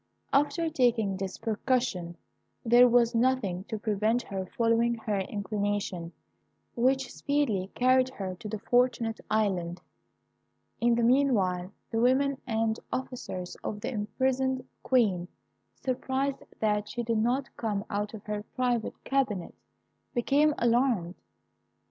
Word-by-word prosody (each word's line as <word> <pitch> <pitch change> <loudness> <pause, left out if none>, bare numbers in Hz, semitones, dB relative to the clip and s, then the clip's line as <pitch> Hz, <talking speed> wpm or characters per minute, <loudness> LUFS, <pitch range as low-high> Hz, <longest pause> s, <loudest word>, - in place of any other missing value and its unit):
After 295 +4 +2
taking 240 -9 +2
this 190 -1 -4
precaution, 225 -6 -1 0.5
there 240 +2 +7
was 240 0 +4
nothing 230 -7 +1
to 220 - -4
prevent 215 +3 +1
her 190 -2 -5
following 230 +2 +2
her 215 -3 -2
inclination, 200 -3 -2 0.6
which 260 +1 +1
speedily 250 -10 0
carried 255 +1 +4
her 195 -7 -5
to 220 - -7
the 215 - -3
Fortunate 235 0 +1
Island. 185 -5 0 1.0
In 235 0 +3
the 235 - +1
meanwhile, 210 -9 +2 0.2
the 225 - 0
women 265 +2 +2
and 225 -1 0
officers 240 -8 -4
of 210 - -3
the - - -3
imprisoned 260 +4 0
Queen, 200 -9 +2 0.5
surprised 265 +1 -1 0.2
that 210 -1 0
she 240 - -3
did 230 -1 0
not 250 +5 0
come 210 -3 -2
out 205 +1 -2
of 210 - -10
her 210 -1 -3
private 245 -3 -1
cabinet, 250 -10 -1 0.6
became 285 +5 +3
alarmed. 235 -7 +2
230 Hz, 125 wpm, -29 LUFS, 205-255 Hz, 1.0 s, there